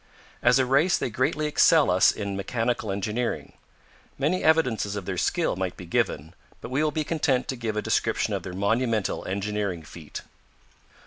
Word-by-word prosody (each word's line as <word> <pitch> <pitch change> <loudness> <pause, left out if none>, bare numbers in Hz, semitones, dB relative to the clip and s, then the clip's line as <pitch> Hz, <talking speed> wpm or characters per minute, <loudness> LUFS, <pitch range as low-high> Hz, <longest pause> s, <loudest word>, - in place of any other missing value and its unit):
As 125 - +5
a 130 - +3
race 140 +8 +3
they 125 - -3
greatly 130 +6 0
excel 150 - +4
us 90 +1 +5
in 100 -2 -4
mechanical 115 +1 -2
engineering. 105 +5 -3 0.6
Many 155 +7 0
evidences 125 -10 +2
of 100 -3 -5
their - - -3
skill - - 0
might 95 -1 -3
be 90 - -9
given, 80 -1 -1 0.3
but - - -9
we 140 +4 +1
will 155 - +2
be 155 +1 -2
content 145 -5 0
to 130 - -1
give 115 -3 -3
a 105 - -1
description - - 0
of - - -1
their 90 - -7
monumental 110 +2 0
engineering 100 -3 -2
feat. 80 -1 -9
115 Hz, 175 wpm, -26 LUFS, 100-135 Hz, 0.6 s, As